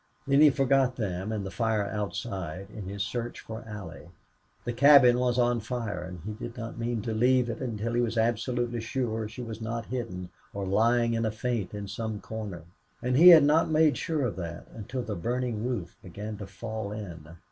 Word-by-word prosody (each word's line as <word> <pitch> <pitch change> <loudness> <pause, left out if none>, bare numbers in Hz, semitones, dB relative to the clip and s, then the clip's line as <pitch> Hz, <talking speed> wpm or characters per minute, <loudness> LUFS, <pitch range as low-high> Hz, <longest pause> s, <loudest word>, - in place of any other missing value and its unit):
Then 140 +1 +4
he 155 - +9
forgot 135 -2 +2
them 95 -3 -3
and 105 -3 -2
the 95 - -5
fight 110 -3 0
outside 100 -3 -4
in 105 -4 -7
his 100 0 -2
search 120 +2 -4
for 110 0 -8
Allie. 100 -6 -8 0.6
The 120 - -2
cabin 130 -2 +7
was 125 -1 +1
on 120 -1 +3
fire, 115 -4 -4
and 90 0 -7
he 105 - -3
did 115 +3 -8
not 115 0 -6
mean 115 -2 -2
to 115 - -2
leave 125 +2 +3
it 115 - -7
until 115 -2 -2
he 120 - +2
was 115 -1 -1
absolutely 120 +1 0
sure 115 -2 -2
she 120 +3 -7
was 115 -1 -7
not 115 +1 -3
hidden 90 -8 -5 0.2
or 100 -1 -2
lying 115 +4 +3
in 115 0 0
a 110 - +1
faint 110 -3 -2
in 100 -1 -5
some 110 0 -4
corner. 105 -7 -6 0.4
And 125 +1 +1
he 165 +6 +8
had 165 -4 +10
not 155 +3 +4
made 155 -1 +4
sure 155 -3 -1
of 110 - -3
that 85 -1 -6
until 120 +4 -5
the 110 - -4
burning 120 +3 -2
roof 115 -9 -3
began 105 +4 -7
to 100 -2 -7
fall 100 +2 -5
in. 85 -6 -8
115 Hz, 200 wpm, -28 LUFS, 105-125 Hz, 0.6 s, had